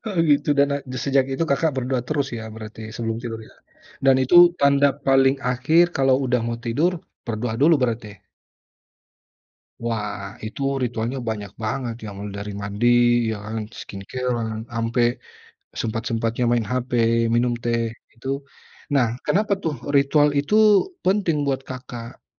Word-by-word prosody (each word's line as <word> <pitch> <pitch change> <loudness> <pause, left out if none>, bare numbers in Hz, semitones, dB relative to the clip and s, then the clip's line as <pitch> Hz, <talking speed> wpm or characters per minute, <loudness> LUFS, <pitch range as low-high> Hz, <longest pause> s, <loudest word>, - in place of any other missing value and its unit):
Oh, 205 - -4
gitu 145 0 +3
dan 140 0 +5
a 140 - -1 0.3
sejak 135 -1 +3
itu 165 - 0
Kakak 155 +3 +2
berdoa 130 0 -1
terus 145 -3 0
ya, 110 - -7
berarti 110 0 -9
sebelum 115 -1 -2
tidur, 115 -2 -5 0.7
dan 135 -1 +6
itu 130 +7 +4 0.2
tanda 140 0 +5 0.2
paling 135 0 +4 0.2
akhir 155 +8 +4
kalau 135 -1 +4
udah 125 -1 +1
mau 115 0 -3
tidur, 135 +10 +1 0.3
berdoa 115 0 -2
dulu 160 +4 +6
berarti? 110 -5 -3 1.6
Wah, 105 -3 -4
itu 110 - -8 0.2
ritualnya 120 +2 -2
banyak 105 -3 -4
banget 120 +1 -2
ya, - - -5
mulai 100 -1 -6
dari 105 0 -5
mandi 100 +4 -2 0.4
ya 110 - -2
kan, 110 +1 -4 0.2
skincare-an 115 +3 -3 0.3
ampe, 115 +1 0 0.8
sempat-sempatnya 115 +1 -2
main 120 -3 +1
hape, 125 -1 -1 0.4
minum 120 +1 +2
teh, 115 0 +1 0.3
itu 115 +3 -11 0.7
nah, 130 -4 +4 0.2
kenapa 210 +1 +1
tuh 160 -2 0 0.2
ritual 145 +2 +4
itu 145 +9 0 0.5
penting 185 -5 +2
buat 135 -1 0
Kakak? 125 -2 -8
125 Hz, 140 wpm, -23 LUFS, 115-140 Hz, 1.6 s, dan